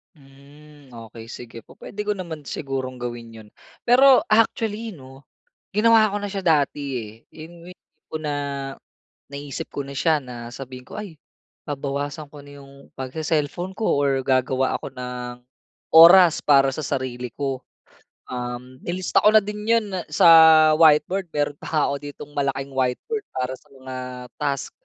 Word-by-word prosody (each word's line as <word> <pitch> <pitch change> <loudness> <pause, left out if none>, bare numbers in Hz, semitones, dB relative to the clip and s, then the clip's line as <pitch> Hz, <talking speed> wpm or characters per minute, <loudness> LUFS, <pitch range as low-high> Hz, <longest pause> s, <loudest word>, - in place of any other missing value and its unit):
Mm. 145 +1 -18
Okey 115 0 -11
sige, 115 0 -9
pu-puwede 205 - -13
ko 210 - +2
naman 165 -6 -7
sigurong 135 -2 -4
gawin 120 -1 -6
yun. - - -18 0.4
Pero 260 +2 +6
actually 220 -1 +1
'no, 135 -1 -15 0.5
ginawa 220 +1 +4
ko 205 - -2
na 205 - -4
siya 195 -2 -4
dati, 150 -4 +2 0.2
eh, 110 -2 -8 0.2
yung 170 +2 -12
tipo 180 -3 -11
na, 150 -2 -3 0.9
naisip 140 -1 -7
ko 140 - -5
na 140 - -9
siya 150 +2 +1
na 120 -2 -9
sabihin 125 +1 -10
ko, - - -10
"Ay 200 -8 -8 0.5
babawasan 145 +2 -4
ko 150 - -11
na 145 0 -13
'yong 140 0 -16
pag-se-cellphone 155 +6 -3
ko 220 - -2
or 135 -1 +1
gagawa 130 0 +1
ako - - -6
ng 125 -1 -6 0.6
oras 170 +1 +8
para 135 -2 +4
sa 155 - -5
sarili 130 -2 -3
ko." 135 -2 -3 0.7
Um, 125 +1 -6
nilista 180 +3 0
ko - - +3
na 215 - +6
din 210 +1 -6
yun 230 -3 +2 0.2
sa 150 +2 +5 0.5
whiteboard, 165 +4 +4
meron 145 -1 -1
pa - - -9
nga 155 -2 +1
ako - - -1
ditong 145 0 -10
malaking 140 -1 -2
whiteboard 135 - -2
para 130 0 -2
sa - - -28
mga 130 -2 -10 0.4
task. 140 -2 -2
145 Hz, 150 wpm, -23 LUFS, 130-170 Hz, 0.9 s, oras